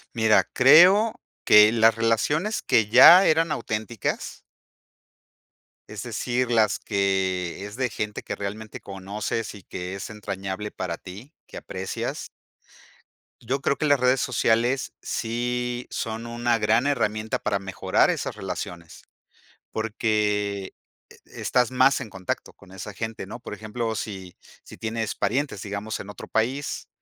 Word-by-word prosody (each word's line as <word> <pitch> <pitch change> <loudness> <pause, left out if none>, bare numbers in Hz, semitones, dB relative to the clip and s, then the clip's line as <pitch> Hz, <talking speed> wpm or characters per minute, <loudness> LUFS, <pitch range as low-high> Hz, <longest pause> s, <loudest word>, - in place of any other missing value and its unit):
Mira, 110 -1 +4
creo 180 - +6 0.2
que 105 0 +8
las 115 -1 +4
relaciones 130 - 0
que 110 -2 +2
ya 170 - +9
eran 165 +1 +3
auténticas. 110 -4 -3 1.5
Es - - -7
decir, 125 0 -2
las 110 -2 +3
que 95 -2 -1
es 105 +1 -9
de 130 0 -1
gente 105 -1 -4
que - - -4
realmente 105 +2 -6
conoces 100 +3 -5
y 100 - -13
que 90 +2 -6
es 100 - -6
entrañable 100 -1 -5
para 85 -2 -4
ti, 105 - -11
que - - -10
aprecias. - - -5 1.2
Yo 130 +4 -1
creo 140 - +1
que 150 - -1
las 145 -1 +4
redes 125 0 +3
sociales 120 +1 +1
sí 120 +1 -3
son 115 +1 -4
una 120 0 0
gran 110 +4 +2
herramienta 110 -6 -1
para 100 - 0
mejorar 95 -1 +1
esas - - -4
relaciones, 90 -3 -7 0.7
porque 105 -3 -1 0.4
e - - -13
estás 125 -2 +2
más 130 +2 +4
en 120 - -7
contacto 95 -2 -5
con 95 -2 -18
esa 95 +2 -8
gente, 110 0 -5
¿no? 110 - -8
Por - - -8
ejemplo, 110 +2 -4
si 95 -5 -6 0.3
si - - -13
tienes 110 -1 -3
parientes, 125 -1 -1
digamos, 105 +1 -4
en 100 - -8
otro 105 - -9
país, 130 +6 -1
110 Hz, 140 wpm, -25 LUFS, 100-125 Hz, 1.5 s, ya